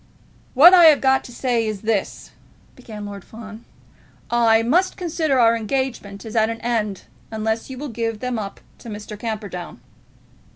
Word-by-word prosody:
"What 330 +8 +9
I 350 -2 +8
have 310 -3 +7
got 265 0 +2
to - - -11
say 240 -2 -1
is 210 -3 -4
this," 215 -3 -2 0.4
began 215 -5 -9
Lord 200 -2 -8
Fawn; 220 0 -12 0.7
"I 230 -1 +4
must 350 +11 +1
consider 315 -6 0
our 230 -1 +5
engagement 230 -4 -4
as 220 - -8
at 220 0 +3
an 230 0 -5
end 215 -5 -2 0.3
unless 220 +1 -3
you 260 - -7
will 290 +2 -6
give 225 -2 -3
them 250 -1 -3
up 200 -2 -7 0.2
to 235 - -10
Mr. 210 0 -8
Camperdown." 205 - -6
225 Hz, 165 wpm, -21 LUFS, 215-255 Hz, 0.7 s, What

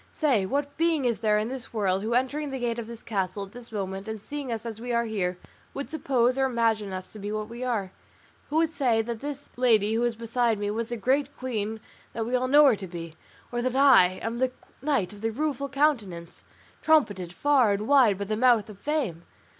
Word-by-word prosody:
Say, 250 - +2
what 285 +4 -2
being 325 -4 +2
is 235 -2 +1
there 215 -2 +2
in 215 +1 0
this 255 -1 -7
world, 195 -4 0
who 225 +3 -1
entering 285 +4 0
the 270 - -4
gate 240 -2 -2
of 225 - -6
this 235 -1 -10
castle 200 -1 -2
at 195 - -17
this 240 0 -12
moment, 195 -1 -4
and 220 0 -4
seeing 280 +4 -6
us 225 0 -4
as 225 -1 -6
we 245 0 -4
are 235 0 +1
here, 185 -5 -2 0.4
would 280 - -5
suppose 265 -4 +1
or 270 - +3
imagine 225 -5 +1
us 185 0 -7
to 215 - -9
be 205 +1 -4
what 215 0 -3
we 235 +2 -6
are? 215 -7 -1 0.6
Who 300 - -4
would 325 0 +2
say 240 -7 +2
that 230 0 -5
this 285 +1 -7
lady 220 -4 +3
who 225 - +1
is 240 -1 +1
beside 230 0 0
me 205 0 -2
was 230 +1 -3
the 240 - -3
great 270 +5 0
queen 220 -4 -3 0.3
that 225 0 -2
we 245 +2 -1
all 255 0 +1
know 295 +3 +7
her 265 -5 +6
to 190 -1 -7
be, 170 -2 -8 0.4
or 240 0 -1
that 255 +1 -1
I 255 -10 +6
am 230 +1 -3
that 255 0 +1 0.3
Knight 270 -10 0
of 205 - -12
the 225 0 0
Rueful 280 +2 -2
Countenance, 230 - -1 0.4
trumpeted 205 - +2
far 260 +1 +3
and 210 +2 -3
wide 255 -8 +5
by 200 - -3
the 215 +2 -1
mouth 235 -2 +3
of 200 - -14
Fame? 265 - -2
235 Hz, 230 wpm, -27 LUFS, 210-265 Hz, 0.6 s, know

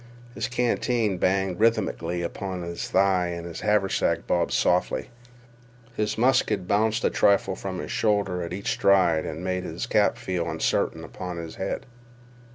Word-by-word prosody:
His 120 - -2
canteen 120 -4 0
banged 95 -1 +1
rythmically 95 -6 +1
upon 90 +1 -4
his 85 0 -5
thigh, 95 -2 +3
and 85 -1 -5
his 85 -2 -7
haversack 105 -2 +1
bobbed 85 -1 +1
softly. 90 +7 +1 0.8
His 105 0 -1
musket 125 -6 +2
bounced 110 +3 +1
a - - +2
trifle 100 -1 +3
from 95 -1 -5
his - - -5
shoulder 100 -4 +1
at 85 - -5
each 95 +3 -2
stride 90 -5 +3
and 80 +3 -5
made 90 0 -1
his 60 -8 -4
cap - - +2
feel 90 -2 -2
uncertain - - 0
upon 90 -1 -6
his 85 -1 -7
head. 95 - -3
95 Hz, 155 wpm, -25 LUFS, 90-105 Hz, 0.8 s, thigh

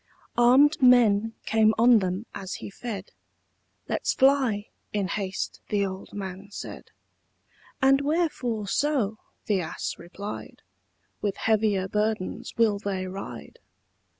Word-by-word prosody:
Arm'd 265 +6 +5
men 225 -4 +5
came 220 0 +3
on 235 0 +6
them 185 +3 -2
as 190 -1 -5
he - - -8
fed: 205 -3 -6 0.8
"Let's - - -1
fly," 260 -6 +3 0.2
in 200 -3 -1
haste 190 0 -3
the 205 -1 +1
old 190 0 -7
man 195 0 -6
said. 200 - -8 1.0
"And 270 +1 +5
wherefore 280 -9 -1
so?" 230 -4 0 0.3
the 200 -3 +1
ass 160 0 -4
replied; 195 +4 -8 0.6
"With 205 -2 -1
heavier 215 -3 +1
burdens 210 +2 -2
will 220 -3 +3
they 195 -2 -3
ride?" 190 +2 -8
210 Hz, 120 wpm, -26 LUFS, 195-240 Hz, 1.0 s, on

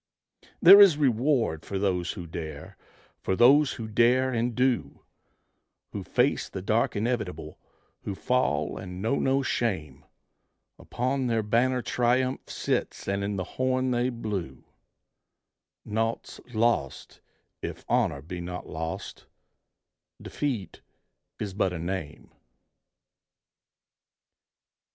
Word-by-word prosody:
There 200 +1 +11
is 185 -7 +7
reward 125 - +1
for 100 - -4
those 90 -3 0
who 90 -5 -7
dare, 80 -3 -7 0.4
for 95 - -1
those 135 +6 +5
who 115 -2 -6
dare 125 +4 +3
and 120 0 -1
do: 125 -1 0 0.9
Who - - -5
face - - +1
the 95 - -6
dark 110 +4 +1
inevitable, 100 -9 -3 0.4
who 100 - -5
fall 125 - 0
and 90 -1 -8
know 115 +8 0
no 135 +1 +1
shame; 80 - -2 0.8
Upon 130 +1 -2
their 115 -2 +1
banner 125 +4 +1
triumph 125 +2 0
sits - - -2
and 100 0 -1
in 100 0 -2
the 95 - -2
horn 130 +5 -1
they 120 +1 +1
blew, 100 - -5 1.2
Naught's 115 +2 -3
lost 110 - -1 0.4
if - - -6
honor 70 -1 +1
be 90 +2 -6
not 90 +1 -6
lost, 80 +1 -6 0.9
defeat 120 - -4 0.6
is 100 -3 -5
but 95 -2 0
a - - -4
name. 85 -3 -5
110 Hz, 115 wpm, -27 LUFS, 90-125 Hz, 1.2 s, There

